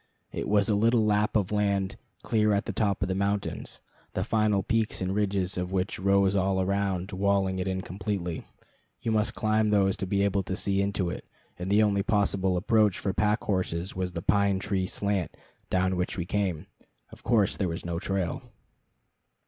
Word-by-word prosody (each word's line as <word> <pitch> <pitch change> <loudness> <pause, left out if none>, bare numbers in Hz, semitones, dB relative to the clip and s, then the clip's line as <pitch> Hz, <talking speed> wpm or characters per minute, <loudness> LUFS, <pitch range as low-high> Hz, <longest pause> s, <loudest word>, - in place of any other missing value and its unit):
It - - -4
was 105 -1 +3
a 110 - +2
little 115 +2 +3
lap 105 +1 +1
of 105 -3 +1
land 100 -2 0 0.3
clear 105 -2 +2
at 100 - -1
the - - -3
top 100 -4 0
of - - -1
the 95 - -1
mountains, 100 +1 -2 0.3
the - - -1
final 105 -3 +1
peaks 115 -1 0
and 95 0 -1
ridges 100 -3 0
of 90 0 -3
which 95 0 -1
rose 100 0 +3
all 95 0 +1
around, 95 0 -1
walling 95 -1 +1
it 90 - -2
in 95 0 -1
completely. 90 -2 -4 0.5
You 115 - -1
must 110 +1 +1
climb 110 0 +1
these 100 -2 +3
to 95 - -3
be 100 +1 +1
able 100 0 +1
to 95 0 -4
see 100 -1 0
into 100 -3 -1
it, - - -6 0.4
and 90 +1 -4
the 105 +2 +5
only 100 -2 +2
possible 100 -3 +1
approach 105 0 +3
for 95 - -2
pack 105 +1 +1
horses 95 -2 -2
was 90 -1 -3
the 85 - -5
pine 100 0 +3
tree 95 -1 -1
slant, 100 -4 -1 0.3
down 95 0 +1
which 90 +2 -2
we 85 - -2
came. 95 -5 -1 0.5
Of - - -13
course 110 -4 +2
there 95 -3 -1
was 85 +2 -5
no 85 -1 -2
trail. 95 -3 -2
100 Hz, 190 wpm, -28 LUFS, 95-105 Hz, 0.5 s, the